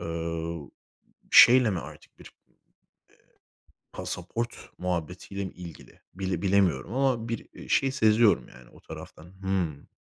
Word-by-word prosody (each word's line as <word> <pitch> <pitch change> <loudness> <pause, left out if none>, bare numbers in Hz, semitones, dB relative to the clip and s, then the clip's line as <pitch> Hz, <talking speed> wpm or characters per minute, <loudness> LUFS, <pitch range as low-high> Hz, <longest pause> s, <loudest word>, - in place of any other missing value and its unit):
Eee, 85 -1 -4 0.6
şeyle 125 -1 +8
mi 95 - -1
artık 65 - -13
bir, - - -14 0.2
eee, - - -35 1.4
pasaport 115 +7 -5
muhabbetiyle 90 +2 -4
mi 95 - -6
ilgili 85 -3 -12
bile 95 -2 -3
bilemiyorum 95 -5 +2
ama 130 -4 +1
bir, 115 -1 -4
eee, - - -12
şey 135 -1 +2
seziyorum. 110 - +3
Yani 65 -1 -16
o - - -18
taraftan. 80 - -11 0.2
Hımm, 90 -7 -2
95 Hz, 125 wpm, -27 LUFS, 85-110 Hz, 1.4 s, şeyle